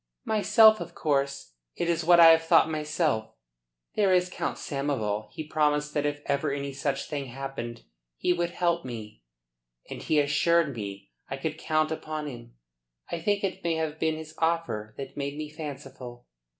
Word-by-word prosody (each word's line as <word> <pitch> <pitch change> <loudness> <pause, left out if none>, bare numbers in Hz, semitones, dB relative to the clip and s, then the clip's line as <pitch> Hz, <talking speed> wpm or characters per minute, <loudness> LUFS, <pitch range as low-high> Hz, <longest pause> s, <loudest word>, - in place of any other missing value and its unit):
"Myself, 220 0 +6
of 170 0 -7
course. 140 - -1 0.2
It 170 - -1
is 170 -1 +1
what 175 +1 +6
I 165 -1 +10
have 165 0 +5
thought 165 - +5
myself. 155 -6 -1 0.6
There 200 -3 +3
is 180 0 +3
Count - - -3
Samoval. 130 -8 -2
He 155 - -6
promised 150 -1 +1
that 145 0 +1
if 145 0 -4
ever 140 +1 0
any 140 0 -3
such 140 0 -2
thing 145 -3 -3
happened 125 - -6 0.3
he 180 - +2
would 175 -1 -1
help 170 -1 0
me. 110 - -8 0.7
And - - -6
he 155 - +2
assured 150 +1 +2
me 100 -2 -7 0.2
I - - -3
could - - -4
count 155 0 +1
upon 155 -1 -4
him. - - -9 0.6
I 170 - -2
think 205 +4 0
it 190 -2 -2
may 170 -1 +1
have 160 -1 -2
been 160 -1 +1
his 160 0 -8
offer 160 -11 -1
that 135 -1 -7
made 140 0 -3
me 155 -1 -5
fanciful." 135 -5 -8
150 Hz, 175 wpm, -27 LUFS, 135-165 Hz, 0.7 s, I